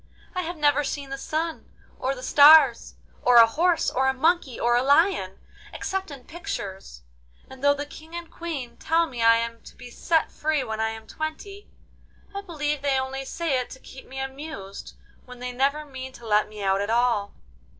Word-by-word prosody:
I 365 - -1
have 345 0 -5
never 290 -1 +3
seen 280 0 -5
the 275 - -3
sun, 320 +3 -3 0.3
or 265 +1 -1
the 255 - -10
stars, 290 -4 +6 0.3
or 245 - +4
a 230 -1 +10
horse, 330 +8 +1
or 265 +1 +1
a 265 - +1
monkey, 315 -2 +1
or 240 0 +2
a 245 - +3
lion, 280 - +2 0.3
except 385 -1 -4
in 275 -4 -10
pictures, 200 - -7 0.4
and 265 0 -13
though 285 0 +5
the 290 +1 -4
King 315 +3 -12
and 340 -1 -7
Queen 275 -9 -6
tell 330 +1 +2
me 250 -7 -7
I 230 0 +6
am 230 0 -4
to - - -14
be 245 - -12
set 325 +5 0
free 305 -2 -1
when 220 0 -5
I 220 0 +1
am 220 0 -8
twenty, 355 - -7 0.6
I 400 - -4
believe 300 -6 -3
they 280 -2 +1
only 265 +1 -4
say 295 -2 -1
it 250 - -5
to 260 - -11
keep 260 - -13
me 265 - -10
amused, 265 -7 -7 0.3
when 250 0 -11
they 250 0 -5
never 280 +4 0
mean 260 -2 -8
to 235 - -13
let 210 -1 +2
me 210 -1 -8
out 195 0 +2
at 205 - -3
all. 230 -3 +1
270 Hz, 200 wpm, -25 LUFS, 240-315 Hz, 0.6 s, a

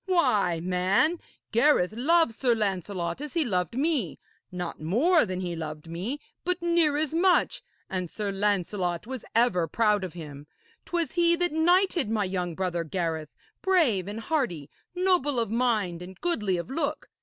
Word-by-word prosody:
Why, 230 - +2
man, 185 - +2 0.3
Gareth 230 -6 +3
loved 315 +3 +3
Sir 240 0 +1
Lancelot 195 - -2
as 295 +1 -6
he 330 -3 +2
loved 185 +1 -1
me 275 - 0 0.3
not 180 -3 -5
more 275 - +3
than 185 0 -3
he 175 -2 -3
loved 155 -1 -6
me, 190 - -4 0.2
but 360 0 0
near 340 -4 +2
as 310 0 -1
much; 360 +2 +3 0.3
and 185 -2 -3
Sir 205 +1 -3
Lancelot 195 -3 -1
was 260 0 -6
ever 205 -8 +3
proud 210 +2 +2
of 185 - -5
him. 150 -4 -9 0.4
'Twas 340 -2 -1
he 340 -1 +3
that 350 0 0
knighted 345 - +3
my 220 -2 +1
young 180 -3 -3
brother 175 -2 -1
Gareth, 160 -2 -3 0.3
brave 300 - +2
and 210 +2 -5
hearty, 225 - -2 0.2
noble 355 -8 +2
of 230 -2 -1
mind 220 -8 0
and 185 +1 -10
goodly 210 - 0
of 170 +9 -5
look! 295 +1 -2
215 Hz, 160 wpm, -27 LUFS, -, 0.4 s, Gareth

